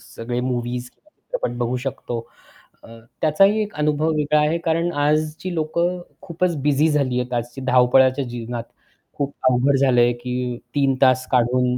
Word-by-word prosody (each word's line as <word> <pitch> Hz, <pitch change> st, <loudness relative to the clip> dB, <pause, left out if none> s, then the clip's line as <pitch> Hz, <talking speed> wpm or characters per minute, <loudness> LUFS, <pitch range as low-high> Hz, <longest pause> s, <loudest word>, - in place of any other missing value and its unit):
सगळे 120 Hz, +1 st, -3 dB
मूवीज 125 Hz, 0 st, -3 dB
किंवा 305 Hz, -, -32 dB
चित्रपट -, -, -4 dB
बघू 120 Hz, +1 st, -1 dB
शकतो 125 Hz, -3 st, -4 dB, 0.6 s
अ, -, -, -14 dB, 0.3 s
त्याचाही 195 Hz, +7 st, +4 dB
एक 210 Hz, 0 st, -4 dB
अनुभव 150 Hz, +1 st, +1 dB
वेगळा 150 Hz, 0 st, +2 dB
आहे, 150 Hz, +2 st, +2 dB
कारण 165 Hz, +1 st, 0 dB
आजची 155 Hz, +4 st, 0 dB
लोक 155 Hz, +1 st, -2 dB, 0.4 s
खूपच 175 Hz, -1 st, -1 dB
बिझी 150 Hz, +2 st, +3 dB
झाली 135 Hz, -5 st, +1 dB
आहेत, 125 Hz, 0 st, -4 dB
आजची 120 Hz, +2 st, -4 dB
धावपळाच्या 130 Hz, +2 st, +4 dB
जीवनात. 120 Hz, -1 st, -5 dB, 0.5 s
खूप 140 Hz, 0 st, -2 dB, 0.2 s
अवघड 130 Hz, +3 st, +2 dB
झालंय 125 Hz, -3 st, +4 dB
की 125 Hz, 0 st, -4 dB, 0.2 s
3 135 Hz, -2 st, +2 dB
तास 130 Hz, -1 st, +4 dB
काढून 125 Hz, 0 st, +2 dB
135 Hz, 150 wpm, -21 LUFS, 125-155 Hz, 0.6 s, त्याचाही